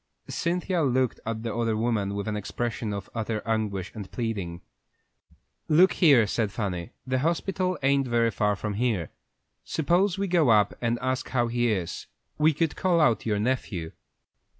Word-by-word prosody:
Cynthia 175 +1 -1
looked 130 -3 +1
at 115 0 -3
the 115 -2 -3
other 115 -2 0
woman 110 -3 0
with 100 +1 -3
an 105 - -1
expression 110 +1 -3
of 100 -2 -5
utter 110 -1 -2
anguish 105 -4 -1
and 100 -4 -8
pleading. 100 -8 -3 1.1
"Look 175 +5 +5
here," 140 - +5
said 105 0 -1
Fanny; 100 -2 -4
"the 130 0 0
hospital 185 +4 0
ain't 135 -1 +3
very 115 -1 +2
far 105 0 +1
from 105 +1 -4
here. 105 -6 -1 0.5
Suppose 175 +5 +1
we 200 0 -1
go 170 -7 +3
up 105 -3 +5
there - - -15
and 115 +1 +1
ask 130 0 -1
how 120 -2 +1
he 120 0 +1
is? 90 -5 -3 0.3
We 155 +1 +5
could 160 +1 -1
call 180 -3 +2
out 120 -8 +2
your 105 -2 +1
nephew." 100 -8 -2
115 Hz, 170 wpm, -26 LUFS, 105-140 Hz, 1.1 s, Look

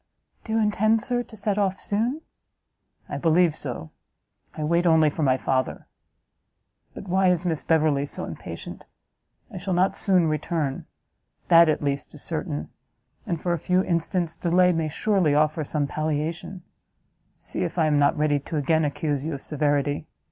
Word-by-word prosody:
"Do 220 - -4
you 225 - +2
intend, 215 +1 +2
Sir, 245 +1 0
to 240 - -11
set 205 0 -1
off 195 -2 0
soon?" 235 +9 -1 0.9
"I - - -4
believe 165 -1 +3
so; 120 - -6 0.7
I 155 - -3
wait 170 +3 +2
only 160 -2 +5
for 160 - -5
my 130 -3 +3
father. 130 0 -1 1.1
But 195 - -9
why 190 +1 +2
is 180 0 +1
Miss 165 -4 -1
Beverley 155 -3 +2
so - - -6
impatient? - - -8 0.7
I 190 - -6
shall 185 0 -2
not 185 +2 +2
soon 185 -4 +2
return; 155 -2 -2 0.6
that, 170 -1 +7
at 155 - 0
least, 140 -1 -2
is - - -7
certain, 75 +2 -3 0.6
and, 170 - -2
for 175 +2 -1
a 170 - -2
few 180 +4 +2
instants 170 -1 -1
delay, 180 +1 +3
may 165 -2 -1
surely 175 -2 +1
offer 155 +1 +2
some 145 0 -1
palliation; 155 +5 -3 0.7
See! - - -4
if - - -4
I 165 - +3
am 150 -1 +2
not 145 +1 +3
ready 150 -1 +2
to 155 +3 -5
again 160 +3 +2
accuse 145 -1 -1
you 160 -1 -3
of 135 - -8
severity! 145 0 0
160 Hz, 170 wpm, -25 LUFS, 150-180 Hz, 1.1 s, that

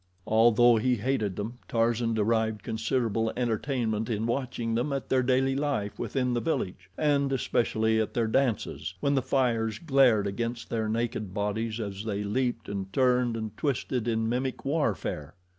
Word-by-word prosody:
Although 115 +1 +5
he 125 +3 +2
hated 110 -4 -1
them, 115 +4 -5
Tarzan 115 0 +1
derived 110 -1 +1
considerable 115 -1 0
entertainment 115 -2 -1
in 110 -1 -1
watching 120 -2 -2
them 120 +6 0
at 135 -1 -3
their 130 -1 +3
daily 130 +1 +2
life 135 -8 -2
within 125 -2 -1
the 120 - 0
village, 95 - -3
and 140 -2 +2
especially 110 -3 +1
at 110 - -4
their 120 -2 +2
dances, 110 -6 -1
when 140 - +1
the 135 - +2
fires 120 -4 0
glared 135 -9 +4
against 115 +3 -3
their 110 -2 -1
naked 110 -3 -2
bodies 110 +2 -2
as 100 -2 -4
they 105 -2 -2
leaped 120 +4 -1
and 95 -1 -4
turned 125 -1 +2
and 110 -1 -5
twisted 130 -3 -1
in 110 -1 0
mimic 130 +3 -2
warfare. 105 - -1
115 Hz, 160 wpm, -28 LUFS, 110-130 Hz, -, Although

